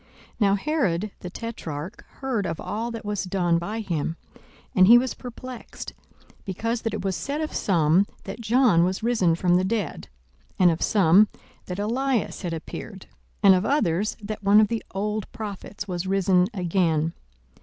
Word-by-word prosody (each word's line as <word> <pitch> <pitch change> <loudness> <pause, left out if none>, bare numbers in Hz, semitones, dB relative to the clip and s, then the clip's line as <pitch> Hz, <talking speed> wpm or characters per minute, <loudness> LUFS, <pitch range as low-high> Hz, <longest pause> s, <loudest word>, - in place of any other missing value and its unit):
42:009:007 - - -30 0.3
Now 200 -2 +4
Herod 210 - 0
the 180 - -7
tetrarch 175 -7 -6 0.2
heard 240 -8 -1
of 165 - -4
all 225 +3 -3
that 230 -2 -7
was 205 -2 -2
done 175 -2 +1
by 210 +6 -4
him: 165 -4 -2 0.6
and 185 0 +6
he 235 +3 +10
was 255 +1 0
perplexed, 250 0 -9 0.5
because 225 +4 -2
that 225 - -2
it - - -5
was 190 -1 0
said 285 +8 -3
of 310 -1 -3
some, 175 +1 +3 0.2
that 200 +4 -7
John 230 -6 +4
was 185 +4 -1
risen 220 -8 +2
from 175 +1 +3
the 185 - +1
dead; 200 -3 -2 0.5
42:009:008 - - -38
And 180 -2 +5
of 165 - -3
some, 200 +1 +5 0.4
that 180 - -4
Elias 240 +4 -1
had 175 - -3
appeared; 190 +4 -7 0.4
and 195 -1 +8
of 185 0 +2
others, 210 - +1
that 210 +1 -5
one 200 +1 +6
of 215 -1 +4
the 230 -1 -2
old 210 +2 -3
prophets 205 -1 -7
was 180 0 -3
risen 190 -1 +3
again. 170 -5 0
200 Hz, 175 wpm, -25 LUFS, 180-225 Hz, 0.6 s, he